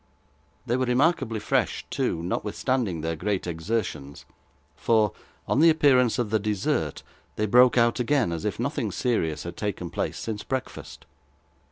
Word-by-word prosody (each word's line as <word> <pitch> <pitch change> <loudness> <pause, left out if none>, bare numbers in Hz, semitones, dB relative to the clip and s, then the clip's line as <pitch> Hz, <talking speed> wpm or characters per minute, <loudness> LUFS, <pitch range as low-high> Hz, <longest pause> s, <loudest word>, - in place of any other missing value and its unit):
They 120 - 0
were 130 - +1
remarkably 125 -3 +1
fresh, 105 - 0
too, 80 - -1
notwithstanding 105 - -1
their 80 +1 -2
great 100 +3 -2
exertions: 80 -5 -4 0.5
for, 110 0 +2 0.4
on - - +1
the 165 +2 +7
appearance 135 -7 +4
of 115 -4 -1
the 110 - +2
dessert, 105 -1 -1 0.3
they 105 - 0
broke 125 +4 +5
out 120 +1 +3
again, 125 -5 +1
as 80 -1 -4
if 105 - -3
nothing 120 -4 -2
serious 90 - -1
had 85 0 -7
taken 95 -4 -4
place - - -3
since 110 -2 -5
breakfast. 130 -1 -6
110 Hz, 150 wpm, -26 LUFS, 90-125 Hz, 0.5 s, the